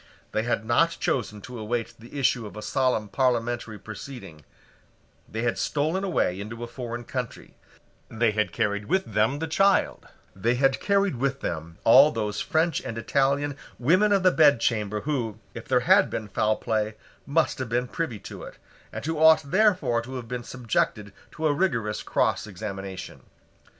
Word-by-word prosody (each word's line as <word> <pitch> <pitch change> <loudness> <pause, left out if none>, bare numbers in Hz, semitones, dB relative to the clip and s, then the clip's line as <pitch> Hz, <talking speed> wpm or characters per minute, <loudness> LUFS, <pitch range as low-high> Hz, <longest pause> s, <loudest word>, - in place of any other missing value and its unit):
They 110 - 0
had 110 -1 -1
not 165 +9 +2
chosen 105 -4 -1
to 125 +1 -8
await 115 +1 -3
the 120 +5 -10
issue 125 -4 +1
of 105 - -11
a 105 - -6
solemn 125 -3 0
parliamentary 120 -2 0
proceeding: 105 - -9 0.9
they 110 +2 -3
had 120 - 0
stolen 155 +6 0
away 100 - 0
into 115 +3 -6
a - - -4
foreign 120 -1 -6
country: 125 0 -6 0.6
they 115 0 +1
had 105 0 0
carried 105 -2 -1
with 190 - +1
them 110 +7 +2
the 160 - -2
child: 195 +4 +2 0.3
they 115 +6 +1
had 135 +1 +2
carried 200 -7 +1
with 135 +2 -1
them 80 0 -5
all 135 +6 +8
those 105 -3 -2
French 160 -1 +1
and 115 - -6
Italian 140 +4 +1 0.2
women 185 +12 +3
of 195 -2 +3
the 185 - +6
bedchamber 115 - +3
who, 120 -8 -2 0.2
if 115 - -9
there 125 -1 +3
had 190 +8 +5
been 110 - -4
foul 110 +2 +1
play, 110 -1 -1 0.3
must 155 +1 +1
have 130 -3 -3
been 120 +2 0
privy 125 -5 -3
to - - -9
it, - - -10 0.3
and - - -6
who 160 -1 -2
ought 160 -2 +5
therefore 185 - +3
to 130 +3 -8
have 125 -2 -6
been 125 0 -4
subjected 110 -4 -2 0.2
to 160 - -5
a 150 - +3
rigorous 115 - 0
cross - - 0
examination. 95 -1 -7
120 Hz, 170 wpm, -26 LUFS, 110-145 Hz, 0.9 s, all